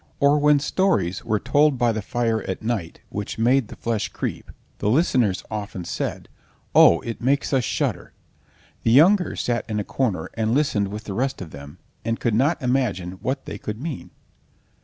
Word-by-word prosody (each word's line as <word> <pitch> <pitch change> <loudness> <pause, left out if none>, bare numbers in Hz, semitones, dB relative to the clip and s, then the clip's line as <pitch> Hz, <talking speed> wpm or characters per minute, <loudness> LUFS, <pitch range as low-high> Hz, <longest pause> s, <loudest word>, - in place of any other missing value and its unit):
Or 140 +1 +4
when 150 0 +5
stories 145 - 0
were 110 -2 0
told 145 +3 +3
by 120 -1 +2
the 110 -1 -2
fire 115 +1 -1
at 95 - -4
night 110 -8 -3
which 105 0 -5
made 120 +2 +3
the - - -10
flesh 115 -3 -2
creep, - - -5 0.3
the 105 - 0
listeners 120 - +2
often 100 -4 -5
said: - - -4 0.5
"Oh, 85 - +7
it 115 -1 -6
makes 140 +4 +1
us 130 -2 +3
shudder!" - - -2 0.7
the - - +1
younger 175 - +5
sat 120 -1 -1
in 105 -1 -1
a - - -1
corner 100 -9 -2
and 110 +1 0
listened 125 -9 +1
with 105 +2 -6
the 100 - -6
rest 130 +6 -1
of 85 -5 -8
them, 70 +3 -10 0.3
and 115 0 -2
could 115 - 0
not 140 +9 +2
imagine 105 -8 -1
what 135 +1 -2
they - - -6
could 105 +1 -5
mean. 150 0 -5
115 Hz, 180 wpm, -23 LUFS, 105-135 Hz, 0.7 s, Oh